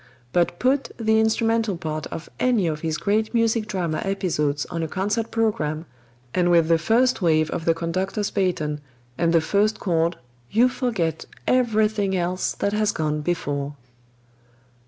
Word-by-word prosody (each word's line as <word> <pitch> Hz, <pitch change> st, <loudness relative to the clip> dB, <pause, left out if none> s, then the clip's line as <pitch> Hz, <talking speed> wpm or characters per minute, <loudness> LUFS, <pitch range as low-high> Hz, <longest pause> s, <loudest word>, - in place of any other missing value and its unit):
But 175 Hz, 0 st, +2 dB
put 265 Hz, +5 st, +1 dB
the 220 Hz, -1 st, +2 dB
instrumental 225 Hz, -2 st, +1 dB
part 155 Hz, -2 st, -4 dB
of 165 Hz, -, -7 dB
any 245 Hz, -7 st, +2 dB
of 155 Hz, -2 st, -1 dB
his 160 Hz, -1 st, -2 dB
great 215 Hz, +5 st, 0 dB
music 230 Hz, -1 st, +2 dB
drama 175 Hz, -6 st, -2 dB
episodes 150 Hz, -7 st, -1 dB
on 170 Hz, -1 st, -2 dB
a 160 Hz, -, -1 dB
concert 205 Hz, +6 st, -1 dB
program, 165 Hz, -9 st, -1 dB, 0.5 s
and 175 Hz, -1 st, +2 dB
with 170 Hz, -2 st, +4 dB
the 165 Hz, -1 st, +4 dB
first 235 Hz, +8 st, +2 dB
wave 155 Hz, -3 st, +2 dB
of 165 Hz, -, -3 dB
the 165 Hz, -, +3 dB
conductor's 185 Hz, +5 st, -2 dB
baton 155 Hz, -6 st, -1 dB, 0.3 s
and 165 Hz, +3 st, +1 dB
the 165 Hz, -1 st, +4 dB
first 205 Hz, +6 st, +1 dB
chord, 165 Hz, -2 st, 0 dB, 0.3 s
you 235 Hz, +4 st, +4 dB
forget 200 Hz, -, -2 dB, 0.2 s
everything 215 Hz, -5 st, +2 dB
else 180 Hz, +1 st, -1 dB
that 200 Hz, -, -1 dB
has 215 Hz, 0 st, +2 dB
gone 150 Hz, -1 st, -1 dB
before! 145 Hz, -3 st, -2 dB
185 Hz, 155 wpm, -23 LUFS, 160-220 Hz, 0.5 s, with